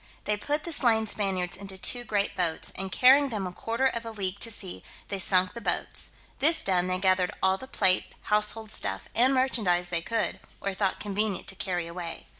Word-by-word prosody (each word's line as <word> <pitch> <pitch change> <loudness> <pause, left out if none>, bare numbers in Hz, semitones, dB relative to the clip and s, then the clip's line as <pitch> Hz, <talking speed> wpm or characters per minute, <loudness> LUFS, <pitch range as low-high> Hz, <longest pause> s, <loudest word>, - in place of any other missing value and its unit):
They 210 - 0
put 295 +8 -3
the 340 - -5
slain 230 -7 +4
Spaniards 190 -4 -1
into 195 0 -8
two 245 +5 +2
great 205 -3 -1
boats, 170 -3 -1
and 190 0 -4
carrying 270 +5 +5
them 210 -5 -3
a 180 - -4
quarter 230 +7 -2
of 235 -3 0
a 230 - -6
league 200 -3 -3
to 230 - +1
sea, 195 -4 -4 0.3
they 195 - -3
sunk 185 0 +3
the 235 - -8
boats; - - -2 0.3
this 320 +3 +4
done, 180 -2 +1
they 185 0 0
gathered 185 -1 +2
all 190 0 +3
the 260 - -9
plate, 190 -7 +3
household 210 +1 +1
stuff, - - 0
and 250 +3 +4
merchandise 200 -9 +1
they 170 -1 -1
could, 225 +5 -2 0.2
or 200 - -3
thought 190 0 -1
convenient 210 0 -2
to 195 - -7
carry 180 -3 -3
away. 170 -1 -7
200 Hz, 205 wpm, -27 LUFS, 185-230 Hz, 0.3 s, carrying